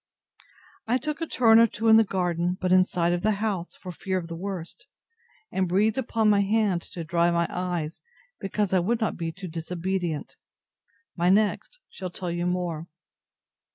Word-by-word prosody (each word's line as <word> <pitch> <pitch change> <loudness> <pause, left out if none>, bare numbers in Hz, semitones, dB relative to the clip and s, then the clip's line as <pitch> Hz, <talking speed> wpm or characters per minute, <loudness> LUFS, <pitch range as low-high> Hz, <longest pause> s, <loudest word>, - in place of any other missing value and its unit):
I 245 +3 +3
took 300 +5 -4
a 330 - -1
turn 225 -5 +5
or 230 - +7
two 225 +1 -3
in 220 0 +8
the 225 - +6
garden, 180 -2 -1
but 185 -1 -1
in 185 0 +7
sight 175 -2 0
of 175 - -1
the 215 +2 +2
house, 200 -4 -3
for 185 - -8
fear 185 +2 -3
of 170 -2 -5
the 165 - -5
worst; 180 -1 -6 0.6
and 185 -2 0
breathed 210 +6 +2
upon 225 -3 0
my 205 -1 +5
hand 200 -3 +1
to 170 - -5
dry 170 +1 +2
my 170 0 +2
eyes, 175 -3 -3 0.4
because 195 0 -1
I 185 - +5
would 225 +7 0
not 220 - -1
be 165 -1 -3
too 185 +3 -8
disobedient. 170 0 -3 0.8
My 175 0 +2
next 210 - +1
shall 185 -1 -7
tell 175 0 -5
you 175 +1 -1
more. 175 -3 -2
185 Hz, 185 wpm, -26 LUFS, 175-210 Hz, 0.8 s, in